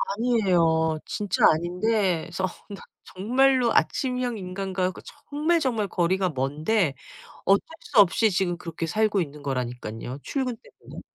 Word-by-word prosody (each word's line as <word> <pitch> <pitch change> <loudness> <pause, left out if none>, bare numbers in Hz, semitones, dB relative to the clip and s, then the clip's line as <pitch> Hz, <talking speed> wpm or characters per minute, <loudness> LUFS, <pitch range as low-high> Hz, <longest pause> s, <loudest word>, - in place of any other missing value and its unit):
아니에요. 175 -9 +2
진짜 205 -3 -2
아닌데 180 +1 0
어 185 - +2 0.3
나 195 - -9 0.3
정말로 250 +4 +3
아침형 250 -3 0
인간과 185 0 -2
거 - - -12 0.3
정말, 310 +4 +1
정말 225 -7 0
거리가 185 +2 +1
먼데 150 +6 0 0.5
어쩔 195 +1 +4 0.2
수 240 - +1
없이 205 +3 +5
지금 180 -2 0
그렇게 165 -1 -5
살고 210 +1 +1
있는 150 -2 -6
거라니깐요 125 -2 -4
출근 255 -4 -2
때문에. - - -13
190 Hz, 290 characters per minute, -25 LUFS, 165-225 Hz, 0.5 s, 없이